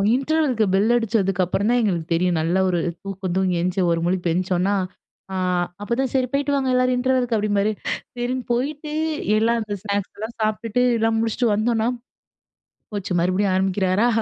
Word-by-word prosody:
இன்டர்வெல்க்கு 275 -4 +1
bell 210 +5 +3
அடிச்சதுக்கு 200 -5 +1
அப்புறம் 200 +5 0
தான் 245 - +3
எங்களுக்கு 175 -7 -1
தெரியும் 175 0 +1
நல்லா 170 +4 +1
ஒரு 175 - +1 0.2
தூக்கம் 195 -2 -4
தூங்கி 190 -2 +1
எஞ்சு, 180 +2 -1
ஒரு 165 - +1
முழிப்பு 180 0 0
எஞ்ச்சோனா 185 +2 +1 0.6
ஆ - - -2 0.5
அப்பதான் 240 +4 -1
"சரி 260 -2 +2
போயிட்டு 285 +1 +1
வாங்க 265 -1 0
எல்லாரும் 255 0 +3
இன்டர்வெல்க்கு." 250 -2 +1
அப்படிம்பாரு. 205 0 +1 0.4
சரின்னு 245 +1 -2
போயிட்டு 290 +5 -2 0.5
எல்லாம் 230 +2 +2
அந்த 210 -1 -4
ஸ்நாக்ஸ் 200 -2 -2
எல்லாம் 220 +3 -6
சாப்பிட்டுட்டு 215 +2 0 0.2
எல்லாம் 225 0 +1
முடிச்சுட்டு 230 +2 0
வந்தோனா, 225 +1 +1 1.1
போச்சு 200 -2 -4
மறுபடியும் 185 +3 +1
ஆரம்பிக்கிறாரா 190 +3 +2
215 Hz, 150 wpm, -22 LUFS, 190-245 Hz, 1.1 s, bell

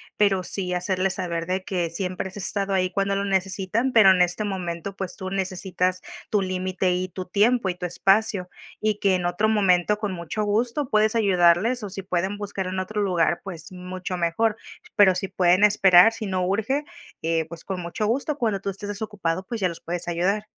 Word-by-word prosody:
pero 200 -2 +2
sí 180 0 -2
hacerles 185 +1 0
saber 170 -3 -3
de 185 +1 -2
que 175 -3 -1
siempre 180 +2 -3
has 190 - -12
estado 200 0 -2
ahí 185 -1 +1
cuando 195 +1 0
lo 200 - -1
necesitan, 195 +5 0
pero 215 -5 +7
en 185 - +3
este 180 +4 +1
momento, 185 -1 -4
pues 190 -2 -5
tú 185 - -5
necesitas 185 -1 -1 0.3
tu 210 - +2
límite, 185 0 -1
y 185 +1 -2
tu 185 +1 -6
tiempo, 210 +4 +2
y 180 - -1
tu 180 - -5
espacio, 195 +1 +1 0.3
y 215 -1 0
que 195 -2 +3
en 180 -1 -2
otro 190 +5 +1
momento 200 -1 +3
con 210 -2 -3
mucho 180 +5 -3
gusto 235 +6 0
puedes 215 -2 +2
ayudarles, 200 +3 +3
o 205 - -4
si 195 +1 -4
pueden 190 +2 -2
buscar 200 -2 -4
en 185 +1 -3
otro 210 +3 -2
lugar, 175 -3 +1
pues 175 -2 -5
mucho 180 0 -5
mejor. 180 +6 +1 0.4
Pero 195 -2 +6
si 190 +2 -2
pueden 185 +1 +4
esperar, 195 0 +6
si 225 - -5
no 185 -1 -1
urge, 220 +9 0 0.4
eh, 165 0 0
pues 170 -1 -9
con 185 -2 -4
mucho 175 +5 -3
gusto, 275 +6 -1
cuando 215 -6 -1
tú 200 - -3
estés 205 +1 -6
desocupado, 200 -4 -3
pues 230 +3 -5
ya 185 - +2
los 170 - -7
puedes 175 +1 -4
ayudar. 185 +5 0
190 Hz, 200 wpm, -24 LUFS, 180-205 Hz, 0.4 s, pero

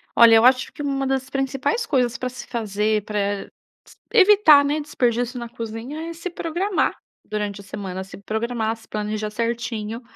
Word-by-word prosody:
Olha, 230 -1 +8
eu 225 - +6
acho 255 0 +4
que - - -8
uma 275 -1 -1
das 265 0 -1
principais 270 - -1
coisas 250 - +1
pra 255 - -3
se 255 - -9
fazer 215 -2 -1
pra 210 -1 -4 0.7
s - - -18 0.2
evitar, 395 -9 +7
né, 290 +2 0
desperdício 245 -3 -1
na 235 - -5
cozinha 240 +8 -6
é - - -5
se 335 +2 -6
programar, 350 +3 -1 0.3
durante 210 -1 -4
a - - -15
semana. 190 -1 -6
Se 190 - -12
programar, 220 +2 -2
se 225 0 -19
planejar 215 0 -3
certinho 230 0 -3
240 Hz, 170 wpm, -22 LUFS, 215-280 Hz, 0.7 s, Olha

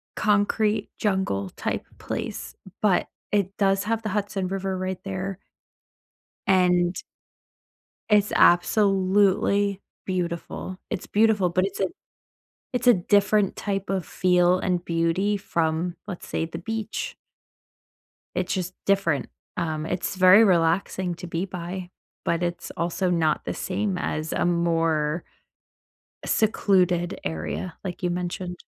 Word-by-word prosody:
concrete 210 +1 +1
jungle-type 190 - -1
place, - - -5 0.3
but 200 -4 +3 0.2
it 200 -1 +1
does 195 -1 +2
have 225 0 0
the 215 - -2
Hudson 200 -2 -1
River 195 -1 -2
right 185 0 -3
there. 195 0 -4 1.1
And 180 -1 +3 1.1
It's 210 -1 +4
absolutely 195 +1 +3 0.3
beautiful. 180 0 -3
It's - - -4
beautiful, 210 -4 +3
but 185 +2 +2
it's 195 - -6
a 190 - +3 0.9
it's 250 0 -1
a 245 - +9
different 200 +2 +2
type 195 -2 -3
of 190 -3 -1
feel 180 0 +3
and 180 -2 0
beauty 170 +5 +1
from, 170 -2 -1
let's 185 -4 -7
say, - - -1
the 165 0 -7
beach. 220 +4 -4 1.2
It's 185 0 -1
just 185 -1 -2
different. 195 -7 +2 0.3
Um, 160 -3 -2
it's 180 +2 -2
very 185 +4 +8
relaxing 180 0 +2
to 180 - -7
be 170 +1 -2
by, 180 -1 -6 0.3
but 170 +1 0
it's 175 0 -3
also 175 +2 0
not 160 -3 +1
the - - -3
same 195 0 -2
as 155 +1 -2
a - - +1
more 165 -2 +1 1.0
secluded 185 -5 +2
area 80 - -4
like 180 -3 -5
you 175 - +2
mentioned. 180 0 -3
185 Hz, 120 wpm, -25 LUFS, 175-195 Hz, 1.2 s, a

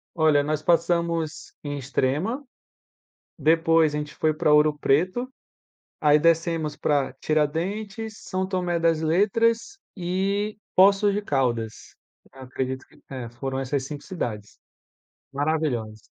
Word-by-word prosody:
Olha, 155 -3 +4
nós 155 +1 -1
passamos 170 -1 0
em 145 0 -3
Extrema, 145 - -1 0.9
depois 160 0 +3
a - - 0
gente 150 0 -6
foi 155 -1 +1
para 150 - +2
Ouro 150 0 +5
Preto, 185 - +1 0.7
aí 150 0 +5
descemos 165 -1 +1
para 140 -3 0
Tiradentes, 195 +10 -2
São 185 0 -2
Tomé 180 -3 -1
das 165 -1 +2
Letras 225 - +1 0.2
e 195 +4 -1 0.2
Poços 200 +2 +5
de 205 - -1
Caldas, 120 - -2 0.4
acredito 130 0 -5
que, - - -23
eh, 125 -4 -6
foram 135 +2 -4
essas 135 +1 -2
5 145 0 -7
cidades. 110 - -5 0.7
Maravilhosa. 140 -7 -1
155 Hz, 120 wpm, -25 LUFS, 140-185 Hz, 0.9 s, Ouro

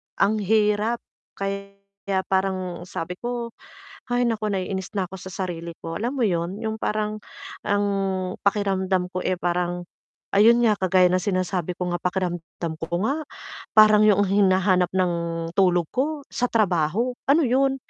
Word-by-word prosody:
ang 200 +2 +2
hirap 210 +2 +1 0.3
kaya 200 0 -4 0.6
parang 185 -2 -1
sabi 180 0 -5
ko, 240 -1 -4 0.6
"Hay 245 0 +1
naku 225 -3 0
naiinis 190 -1 -3
na 195 - +1
ako 190 0 -8
sa 190 - -9
sarili 170 -2 -5
ko." 165 +2 -4
Alam 240 +5 -2
mo 260 - 0
'yun, 175 -2 0
yung 220 0 -3
parang 215 0 -1 0.5
ang 205 0 +2 0.5
pakiramdam 190 -2 0
ko, 185 - -3
eh, 185 0 0
parang 175 0 -1 0.5
ayun 230 +4 +5
nga 215 -3 +3
kagaya 185 -1 +4
ng 185 - +3
sinasabi 185 -2 -1
ko 180 0 -3
nga 175 - -1
pakiramdam 175 -2 -3
ko 170 +3 -2
nga, 275 +7 0 0.6
parang 215 -1 +8
yuong 205 -1 +5
hinahanap 185 -2 +3
ng 180 -2 +2 0.4
tulog 180 -3 +4
ko 290 +3 -1
sa 245 - 0
trabaho, 205 +1 +1 0.2
ano 300 +4 +5
'yun? 270 +1 +2
195 Hz, 150 wpm, -24 LUFS, 180-215 Hz, 0.6 s, parang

